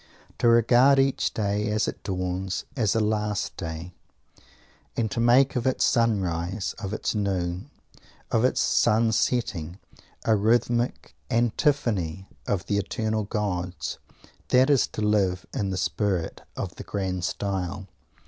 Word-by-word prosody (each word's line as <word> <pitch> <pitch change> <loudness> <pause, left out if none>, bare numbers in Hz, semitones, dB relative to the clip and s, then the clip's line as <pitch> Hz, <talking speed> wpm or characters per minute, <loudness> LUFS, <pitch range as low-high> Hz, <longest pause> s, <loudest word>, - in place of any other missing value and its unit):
To 125 - +3
regard 120 +4 +5
each 135 0 +2
day, 105 0 -1
as 105 0 +1
it - - -5
dawns, 95 0 -3
as 110 -7 +1
a - - +3
"last 105 -1 -1
day," 80 +1 -6 1.1
and 110 -2 0
to 125 - -2
make 125 +3 +4
of 125 +1 0
its 130 - +2
sunrise, 95 -5 0
of 100 -2 -5
its 110 - -2
noon, 95 +1 -2 0.6
of - - +2
its - - +2
sun 110 +1 +3
setting, 95 -8 -1 0.5
a 110 - +4
rhythmic 120 +3 +1 0.2
antiphony 115 - 0 0.2
to 100 -3 0
the 100 -1 0
eternal 110 +2 -2
gods 95 -4 -3 0.5
this 130 +1 +5
is 135 -6 +4
to - - -6
live 100 -4 +1
in 105 -8 -1
the 95 - -2
spirit 95 -2 -1 0.2
of 90 - -5
the - - -7
"grand 95 -1 -3
style." 95 0 -3
105 Hz, 140 wpm, -26 LUFS, 95-115 Hz, 1.1 s, regard